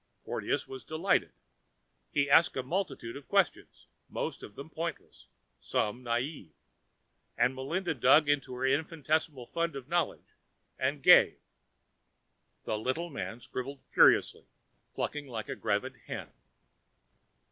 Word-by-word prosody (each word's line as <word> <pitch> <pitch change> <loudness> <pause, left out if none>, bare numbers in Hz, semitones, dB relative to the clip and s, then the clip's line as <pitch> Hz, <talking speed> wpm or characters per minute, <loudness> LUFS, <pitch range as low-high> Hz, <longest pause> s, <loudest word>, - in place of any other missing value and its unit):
Porteous - - -2
was 130 -1 -8
delighted. 160 +5 +1 0.8
He 140 - +1
asked 150 +3 +5
a 130 - -1
multitude 135 -6 -3
of 140 -1 -10
questions, 195 -5 0 0.2
most - - -4
of 105 - -10
them 140 - -8
pointless, 165 0 -6 0.3
some 105 +4 -1
naive, 120 - -3 0.8
and 125 - +3
Melinda 160 +7 -2
dug 140 +3 +5
into 145 -3 0
her 130 +1 -2
infinitesimal 150 -1 0
fund 165 +3 -2
of 135 -2 -7
knowledge 175 +2 -1 0.5
and - - -1
gave. - - +7 1.3
The 105 - -2
little 160 +9 -2
man 120 -3 -5
scribbled 135 +3 -6
furiously, - - +4 0.5
clucking 150 -1 -3
like 115 -4 -6
a - - -3
gravid - - -1
hen. - - -6
140 Hz, 125 wpm, -31 LUFS, 125-160 Hz, 1.3 s, gave